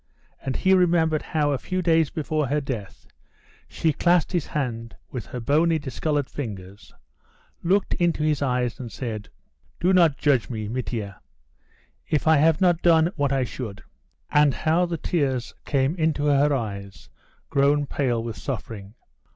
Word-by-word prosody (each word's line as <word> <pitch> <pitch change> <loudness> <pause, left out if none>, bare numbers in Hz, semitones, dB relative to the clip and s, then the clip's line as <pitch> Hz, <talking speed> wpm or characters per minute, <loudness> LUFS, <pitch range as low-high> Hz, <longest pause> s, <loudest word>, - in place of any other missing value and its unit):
And 135 -2 -3
he 190 - +3
remembered 165 -4 +3
how 150 -2 0
a 135 - -1
few 185 +5 -3
days 165 -3 +3
before 155 -2 -2
her 145 +4 +1
death 110 -9 -6 0.6
she 160 -2 0
clasped 175 +2 +2
his 175 -6 -1
hand 115 -6 -4 0.2
with 125 -6 -6
her 125 - -6
bony, 160 +7 +2
discoloured 145 0 -2
fingers, 100 -6 -8 0.7
looked 195 +3 +1
into 170 -3 +1
his 155 -2 +1
eyes, 125 -3 -1
and 120 -3 -7
said: 110 -5 -5 0.5
"Do 185 +2 +2
not 170 -6 +4
judge 140 -6 +2
me, 110 -4 -4
Mitia, 110 -4 -4 0.9
if 155 -2 0
I 160 -1 +6
have 160 +2 +4
not 175 -3 +3
done 165 0 +4
what 145 -3 0
I 135 -1 +1
should," 110 -4 -6 0.5
and 145 -2 +4
how 170 +3 +1
the 170 -1 -3
tears 135 -8 -1
came 135 +1 +1
into 155 -3 0
her 145 0 +3
eyes, 100 - -4 0.4
grown 145 +1 +3
pale 125 -5 -1
with 115 -2 -5
suffering. 110 -5 -6
145 Hz, 155 wpm, -24 LUFS, 120-160 Hz, 0.9 s, I